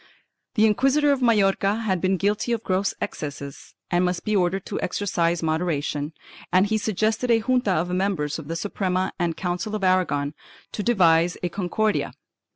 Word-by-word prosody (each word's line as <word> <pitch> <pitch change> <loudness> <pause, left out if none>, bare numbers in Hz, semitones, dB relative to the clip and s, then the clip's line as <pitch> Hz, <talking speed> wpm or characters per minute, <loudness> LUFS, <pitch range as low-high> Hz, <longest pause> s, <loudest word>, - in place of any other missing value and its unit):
The 215 -1 +5
inquisitor 270 +7 +3
of 275 -2 0
Majorca 205 -2 +2
had 190 -6 -1
been 190 0 +2
guilty 210 +5 0
of 230 -1 -2
gross 190 +1 0
excesses 140 -6 -6 0.2
and 175 0 +3
must 180 -1 -1
be 215 - +1
ordered 185 0 +1
to - - -4
exercise 175 -4 0
moderation, 155 -2 -1 0.4
and 185 +2 +4
he 220 +1 0
suggested 220 +4 0
a 230 - +5
junta 250 -2 +1
of 175 +1 -1
members 180 -6 -1
of 150 - -9
the 165 - -3
Suprema 185 0 -1
and 170 -2 -1
Council 180 +5 -2
of 210 - -4
Aragon 160 -6 +1 0.4
to - - -4
devise 175 -6 +3
a 180 - 0
Concordia. 205 +4 -1
185 Hz, 165 wpm, -24 LUFS, 170-215 Hz, 0.4 s, The